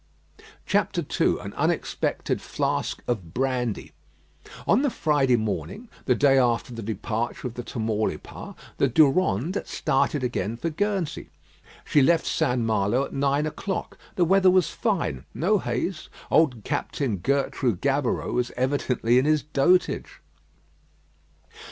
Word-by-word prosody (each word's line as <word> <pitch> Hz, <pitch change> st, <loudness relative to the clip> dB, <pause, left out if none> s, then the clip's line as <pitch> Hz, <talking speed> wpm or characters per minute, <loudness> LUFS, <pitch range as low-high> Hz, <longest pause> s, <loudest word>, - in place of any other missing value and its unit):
II -, -, +1 dB
AN -, -, -7 dB
UNEXPECTED -, -, -1 dB
FLASK -, -, -2 dB
OF 95 Hz, -9 st, -3 dB
BRANDY 125 Hz, -4 st, -1 dB, 0.7 s
On 210 Hz, -, +4 dB
the 285 Hz, -, +2 dB
Friday 145 Hz, -, +2 dB
morning, 120 Hz, -, -3 dB, 0.2 s
the 125 Hz, -, +3 dB
day 135 Hz, 0 st, +4 dB
after 120 Hz, -1 st, +1 dB
the 115 Hz, -, -6 dB
departure 110 Hz, +3 st, -3 dB
of 120 Hz, -, -7 dB
the 120 Hz, -, -5 dB
Tamaulipas, 110 Hz, -2 st, -3 dB, 0.2 s
the 140 Hz, -, +4 dB
Durande 145 Hz, -, +2 dB
started 140 Hz, +1 st, 0 dB
again 115 Hz, -3 st, -2 dB
for 165 Hz, +7 st, -3 dB
Guernsey. 195 Hz, -1 st, -2 dB, 0.6 s
She 145 Hz, -, +3 dB
left 165 Hz, +4 st, +3 dB
St. 125 Hz, 0 st, 0 dB
Malo 110 Hz, +3 st, +1 dB
at -, -, -11 dB
nine 140 Hz, +2 st, +1 dB
o'clock. 185 Hz, +5 st, -4 dB, 0.2 s
The 175 Hz, -, +3 dB
weather 190 Hz, +2 st, +5 dB
was 185 Hz, -2 st, +3 dB
fine; 215 Hz, -7 st, -1 dB
no 200 Hz, +5 st, +2 dB
haze. 155 Hz, +6 st, -3 dB, 0.2 s
Old 130 Hz, -9 st, +3 dB
Captain 140 Hz, -5 st, -2 dB
Gertrais 135 Hz, +1 st, 0 dB
Gaboureau 140 Hz, +1 st, 0 dB
was 125 Hz, 0 st, 0 dB
evidently 125 Hz, -2 st, +2 dB
in 130 Hz, -, 0 dB
his 155 Hz, -2 st, +2 dB
dotage. 155 Hz, +5 st, +1 dB
135 Hz, 125 wpm, -25 LUFS, 120-160 Hz, 0.7 s, weather